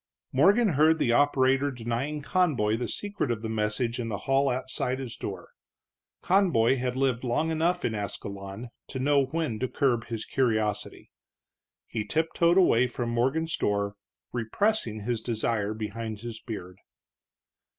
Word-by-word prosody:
Morgan 200 - +4
heard 155 +1 +4
the 120 - +1
operator 135 +1 +3
denying 130 +4 -3
Conboy 145 - +2
the 120 +1 -3
secret 205 - -3
of 115 -2 -2
the 110 - -3
message 110 +2 -1
in 115 -1 -3
the 105 - -2
hall 135 +1 +3
outside 130 0 -2
his 130 -3 -6
door. 95 -3 -7 0.7
Conboy 170 - +3
had 125 0 -2
lived 130 -2 +1
long 130 +6 0
enough 170 +3 +1
in 115 - 0
Ascalon 100 +2 -6 0.2
to - - -6
know 140 +1 +3
when 150 -6 -2
to 130 - 0
curb 125 -4 +1
his 115 -2 -4
curiosity. 110 -5 -1 0.7
He 110 -2 -3
tiptoed 165 - +2
away 125 -10 +5
from 120 -1 -3
Morgan's 135 +8 +1
door, 100 0 0 0.4
repressing 120 - 0
his 115 +1 -2
desire 110 -2 -1
behind 110 0 -5
his 115 -2 -6
beard. 95 -5 -7
125 Hz, 145 wpm, -27 LUFS, 110-145 Hz, 0.7 s, away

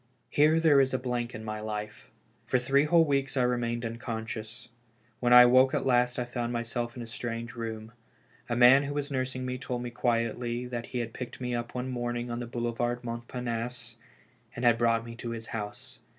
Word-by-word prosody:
Here 155 +2 +4
there 150 -4 +6
is 130 -1 +1
a - - +2
blank 125 -1 -3
in 110 +1 -7
my 110 0 -4
life. 105 0 -6 0.4
For 130 - +3
three 135 +4 +3
whole 165 +1 +5
weeks 140 -2 0
I 125 - +3
remained 120 -1 0
unconscious. 115 -1 -6 0.5
When 120 -1 +1
I 125 0 +11
awoke 130 +2 +5
at - - -1
last 125 -1 +2
I 125 - -1
found 120 -1 -3
myself 120 0 -3
in 120 - -5
a - - -7
strange 115 0 -5
room. 110 -1 -6 0.6
A 120 - 0
man 125 +3 +7
who 145 0 -4
was 145 -1 -3
nursing 130 -1 -2
me 125 0 -3
told 125 -1 -4
me 120 - -5
quietly 120 0 -1
that 120 -1 -5
he 125 - -2
had 115 -1 -5
picked 125 - -7
me 125 -1 -3
up 120 0 -4
one 125 +1 -3
morning 120 -1 -3
on 120 - -3
the 120 - -5
Boulevard 120 +1 -2
Montparnasse, 120 0 -5 0.6
and 120 - -3
had 115 -1 +5
brought 115 -1 +2
me 115 - -8
to 120 - -5
his 115 -1 -5
house. 105 -2 -6
120 Hz, 205 wpm, -29 LUFS, 115-125 Hz, 0.6 s, I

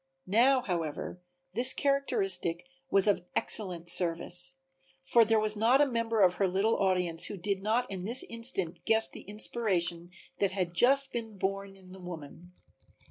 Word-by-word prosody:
Now, 250 +7 +2
however, 170 0 -5 0.3
this 255 +2 +9
characteristic 195 -12 -1 0.2
was 195 -5 +2
of 200 -4 0
excellent 180 -5 +2
service, 175 +1 -1 0.5
for 230 +6 +3
there 220 0 +1
was 215 0 -1
not 230 +5 +2
a 290 - +4
member 230 -4 -2
of 180 -1 +3
her 195 - +1
little 195 +5 0
audience 180 -3 +1
who 205 - -6
did 195 +1 -3
not 225 +5 -1
in 185 -2 -6
this 235 +6 +3
instant 230 -7 -2
guess 225 0 +4
the - - -11
inspiration 185 -5 -2 0.3
that 195 -2 -1
had 180 -3 -3
just 270 +8 +2
been 225 -3 -6
born 195 +1 -5
in 185 -1 -18
the 190 0 -13
woman. 175 0 -11
195 Hz, 160 wpm, -28 LUFS, 180-230 Hz, 0.5 s, this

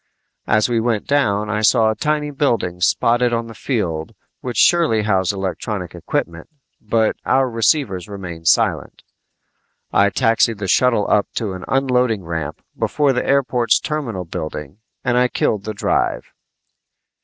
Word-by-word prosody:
As 110 0 +3
we 120 -2 0
went 115 -2 -1
down 105 -8 +1
I 105 0 -1
saw 110 0 +4
tiny 150 +3 -1
buildings 115 - 0
spotted 120 +1 +2
on 115 0 -1
the 115 - -10
field 90 - -3 0.2
which 125 -3 -5
surely 160 -11 +4
housed 95 -3 +1
electronic 95 -1 -4
equipment, 85 - -4 0.3
but 110 0 0
our 135 0 +2
receivers 115 - 0
remained 85 -5 -7
silent. - - +1 0.9
I 100 0 +4
taxied 115 -1 +2
the 100 -1 -4
shuttle 115 +1 +3
up 105 - +2
to 105 -4 -2
an 95 - -8
unloading 125 -6 +1
ramp 80 -3 -5
before 145 -3 +1
the 125 - -1
airport's 125 -4 +2
terminal 120 - -4
building 80 0 -6 0.2
and 125 0 +2
I 125 - +4
killed 105 -4 -1
the 110 - -3
drive. - - -1
110 Hz, 145 wpm, -19 LUFS, 95-125 Hz, 0.9 s, saw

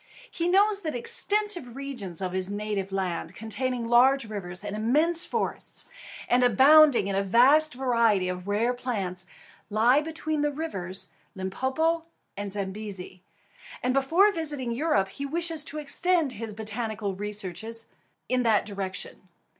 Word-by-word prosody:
He 340 - -2
knows 400 +3 +3
that 315 -7 -4
extensive 355 - +5
regions 245 -11 -6
of 185 - -3
his 185 0 0
native 205 -1 -4
land, 185 -2 -3
containing 240 +2 -3
large 245 +1 +4
rivers 190 -3 -7
and 205 - -5
immense 305 +11 +2
forests, - - -4 0.4
and 250 +1 +2
abounding 270 +3 +6
in 200 0 -2
a 195 - +1
vast 260 +9 +4
variety 230 -7 +1
of 180 +1 -5
rare 220 +4 0
plants, 195 -8 -4 0.4
lie 235 +7 +3
between 310 -1 -3
the 295 0 0
rivers 195 - -4 0.3
Limpopo 265 - -1 0.3
and 205 0 -5
Zambezi, 195 -2 -7 0.6
and 250 0 +1
before 330 +10 +3
visiting 295 -8 -3
Europe 235 -7 0
he 280 - -7
wishes 330 0 0
to 305 -1 -4
extend 325 +1 +2
his 225 -2 -7
botanic 220 0 -5
researches 205 +2 -4 0.4
in 255 0 0
that 225 -4 +2
direction. 190 -2 -7
235 Hz, 140 wpm, -26 LUFS, 200-295 Hz, 0.6 s, abounding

